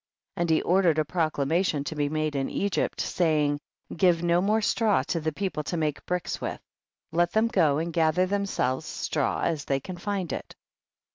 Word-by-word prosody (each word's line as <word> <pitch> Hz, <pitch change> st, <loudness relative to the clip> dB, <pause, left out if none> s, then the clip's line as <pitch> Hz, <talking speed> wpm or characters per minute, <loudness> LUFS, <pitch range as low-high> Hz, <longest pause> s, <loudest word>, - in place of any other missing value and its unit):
12. 185 Hz, -, -5 dB
And 170 Hz, -, -2 dB
he 160 Hz, -, +3 dB
ordered 180 Hz, -3 st, +3 dB
a 155 Hz, -, +3 dB
proclama 160 Hz, 0 st, +1 dB
tion 150 Hz, -6 st, -1 dB
to 150 Hz, -, -4 dB
be 145 Hz, -2 st, -1 dB
made 155 Hz, -1 st, -1 dB
in 135 Hz, -1 st, 0 dB
Ecrypt, 200 Hz, 0 st, -1 dB
saving, 150 Hz, -4 st, +1 dB, 0.4 s
give 175 Hz, -1 st, +3 dB
no 175 Hz, 0 st, +3 dB
more 210 Hz, +3 st, +2 dB
straw 215 Hz, -, +2 dB
to 165 Hz, -, -2 dB
the 155 Hz, 0 st, -1 dB
people 185 Hz, -1 st, -3 dB
to 175 Hz, -, -2 dB
make 155 Hz, -3 st, -1 dB
bricks 180 Hz, -1 st, -2 dB
with, -, -, -3 dB, 0.5 s
let 175 Hz, +1 st, +1 dB
them 220 Hz, +1 st, +3 dB
go 160 Hz, -10 st, +3 dB
and 165 Hz, +2 st, -2 dB
gather 165 Hz, +2 st, +3 dB
themselves 180 Hz, -8 st, -1 dB
straw 150 Hz, -3 st, -1 dB
as 155 Hz, -4 st, -1 dB
they 135 Hz, -1 st, 0 dB
can 180 Hz, +6 st, -8 dB
find 190 Hz, -1 st, -3 dB
it. -, -, -6 dB
165 Hz, 195 wpm, -27 LUFS, 150-185 Hz, 0.5 s, he